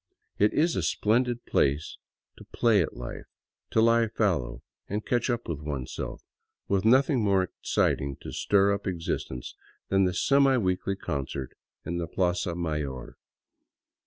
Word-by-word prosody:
It 105 +1 +4
is 165 +2 +2
a - - 0
splendid 120 +2 +1
place 70 +3 0 0.4
:o - - -12
play 110 -4 +3
at 80 - -3
life, - - -7 0.4
to 110 - +3
lie 115 0 +4
fallow 80 - -1 0.2
and 105 +2 -3
catch 120 +1 0
up 120 -1 -1
with 80 -4 -3
oneself, 70 -4 -5 0.4
with 100 +1 +1
nothing 130 +2 +4
more 100 -2 +3
exciting 70 -5 -1
to - - -7
stir 100 0 +3
up 100 0 -4
existence 80 -8 -4 0.3
than 95 0 +3
the 90 -1 -1
semi 135 +5 +4
weekly 95 -2 0
concert 70 -6 -4 0.3
in 85 +1 -2
the 85 - -3
plaza 90 0 0
mayor. 75 -7 -4
95 Hz, 145 wpm, -27 LUFS, 75-115 Hz, 0.4 s, It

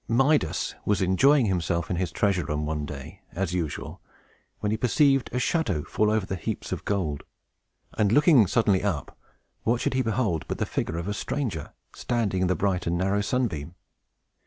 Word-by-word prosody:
Midas 135 +6 +2
was 105 -3 +1
enjoying 125 +9 +4
himself 85 -3 -1
in 90 - 0
his 90 -2 -1
treasure 95 -4 +1
room, 75 0 -2
one 75 -1 -3
day, 70 -2 -9
as 90 -1 -2
usual, 85 -5 -4 0.6
when 105 - -1
he - - +2
perceived 135 +3 +3
a - - -2
shadow 125 - 0
fall 105 +6 +1
over 110 -2 +1
the 95 - -3
heaps 90 - -5
of - - -4
gold; 85 -8 -1 0.7
and, 105 -2 +2
looking 140 - +6
suddenly 100 -3 +2
up, 95 -9 -2 0.5
what 120 +1 +1
should - - -1
he 130 - +2
behold 110 -8 0
but - - -3
the - - 0
figure 85 - -3
of 85 +2 -4
a 105 - -1
stranger, 105 - -3 0.2
standing 110 -6 -1
in 95 - +2
the 90 - +1
bright 90 -1 0
and 85 +1 +1
narrow 95 +3 +1
sunbeam! 95 - -2
95 Hz, 185 wpm, -26 LUFS, 85-115 Hz, 0.7 s, looking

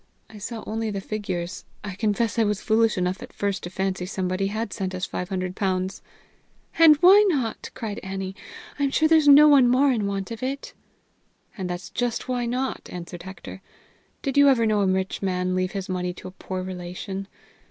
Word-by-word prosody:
I 215 - -11
saw 225 +2 -6
only 225 0 -2
the 200 -2 -3
figures. 190 -3 -4 0.2
I 205 -2 -5
confess 220 +3 0
I - - +5
was 210 -2 0
foolish 220 -1 +2
enough 180 +1 -1
at - - -9
first 200 0 -2
to 175 - -6
fancy 190 -1 -2
somebody 185 0 -1
had 215 0 -3
sent 190 -1 -3
us 185 +1 -2
five 180 -1 -5
hundred 185 -1 -3
pounds!" 185 -1 -1 0.8
"And 320 -2 +9
why 390 +4 +8
not?" 265 - -1
cried 215 -3 -4
Annie. 190 0 -5 0.4
"I 285 - +2
am - - +1
sure 315 +3 +3
there's 315 -2 +4
no 290 +1 +9
one 280 -4 +6
more 265 +3 +4
in 215 -5 0
want 195 +1 -3
of 230 - -6
it." 270 +2 -4 0.8
"That's 180 -3 -5
just 245 -1 -2
why 245 -2 -1
not," 255 +2 -3
answered 175 0 -7
Hector. 190 +1 -9 0.6
"Did 275 -1 -2
you 285 0 +7
ever 235 -4 +3
know 215 -2 +2
a 195 - +2
rich 190 0 -1
man 185 -1 -1
leave 185 0 -1
his 195 -1 -4
money 180 -1 -2
to 180 - -10
a - - -8
poor 185 0 -5
relation? 185 +2 -6
200 Hz, 195 wpm, -24 LUFS, 185-235 Hz, 0.8 s, And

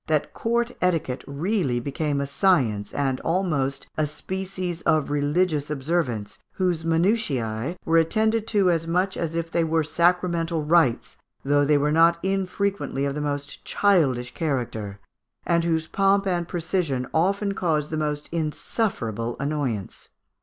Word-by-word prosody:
that 155 -2 0
court 235 +1 0
etiquette 165 -8 0
really 145 - 0
became 145 +3 -2
a 140 - -1
science, 135 - +1
and 135 -2 -1
almost 155 -7 -1
a 155 -1 +1
species 185 +2 -4
of 155 -3 +1
religions 145 +1 +1
observance, 135 -8 -2
whose 180 -4 0
minutiae 165 - 0
were 165 0 +4
attended 220 +6 +1
to 200 -4 +3
as 165 -1 -1
much 180 +3 +1
as 165 -1 -3
if 165 0 -2
they 170 - +2
were 160 0 +1
sacramental 170 0 +1
rites, 150 -6 +2 0.3
though 145 +1 +3
they 145 +1 +4
were 145 +1 +1
not 165 +2 +5
unfrequently 195 -5 -1
of 140 - -1
the 150 - -3
most 145 -1 -4
childish 140 -12 +2
character, 115 - -3 0.5
and 170 0 +2
whose 160 -1 +1
pomp 195 +3 +2
and 175 -3 0
precision 165 -7 -1
often 200 +5 +1
caused 155 -6 -1
the - - -1
most 150 -1 -2
insufferable 150 - -2
annoyance. 140 -9 -3
160 Hz, 140 wpm, -24 LUFS, 140-180 Hz, 0.5 s, not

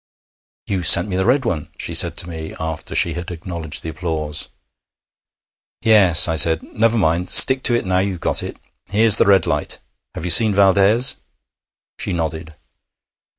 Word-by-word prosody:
'You 95 -2 -4
sent 85 +2 +5
me 90 - -5
the 95 +2 -2
red 130 +1 0
one,' 80 -10 -5
she - - -6
said - - +2
to - - -2
me, 80 -2 -9
after 80 -1 -7
she 85 - 0
had 85 +2 -8
acknowledged 85 -3 -7
the 80 - -7
applause. 80 -2 -6 1.3
'Yes,' 100 -7 +5
I 80 - -3
said. 80 +1 +3
'Never 115 +1 -2
mind; 90 -2 -2
stick 130 0 +6
to 120 - +4
it 120 - -3
now 90 0 -1
you've 95 -2 -4
got - - -2
it. - - -9 0.3
Here's 110 +1 +3
the - - +1
red 95 -4 +2
light. 75 -4 -4 0.4
Have 80 - -7
you 90 - +1
seen 105 +3 +3
Valdès?' 100 +6 +2 0.8
She - - -4
nodded. 80 -1 -6
90 Hz, 170 wpm, -17 LUFS, 80-100 Hz, 1.3 s, stick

